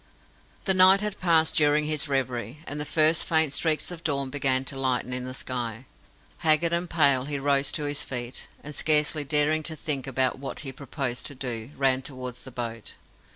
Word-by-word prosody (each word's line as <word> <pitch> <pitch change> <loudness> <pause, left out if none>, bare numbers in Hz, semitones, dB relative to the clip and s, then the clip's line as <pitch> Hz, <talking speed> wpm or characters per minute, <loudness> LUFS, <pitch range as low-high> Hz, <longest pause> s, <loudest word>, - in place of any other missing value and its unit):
The 190 - +3
night 190 +1 +6
had 210 -1 -3
passed 165 -3 +3
during 150 0 +3
his 155 -1 -2
reverie, 125 -2 -2
and 145 - -5
the 150 - -3
first 155 +1 +3
faint 160 -3 +2
streaks 160 +2 0
of 170 -1 -9
dawn 140 -3 -1
began 135 -2 +1
to 135 - -5
lighten 130 -1 -1
in 125 0 -4
the 130 - -6
sky. 120 -2 -3 0.5
Haggard 165 +1 +3
and 170 0 0
pale, 140 -5 +3
he 145 0 -3
rose 140 0 +1
to 150 - -2
his 145 0 -2
feet, 125 -1 -5 0.2
and 150 - -8
scarcely 150 0 +3
daring 150 +2 +2
to 160 +1 -3
think 140 -3 -2
about 130 0 0
what 135 0 -4
he 135 -3 -5
proposed 135 -2 -4
to 145 - -6
do, 120 -3 -4
ran 135 -1 +3
towards 125 -2 -7
the 130 - -10
boat. 115 -2 -6
140 Hz, 195 wpm, -26 LUFS, 130-155 Hz, 0.5 s, night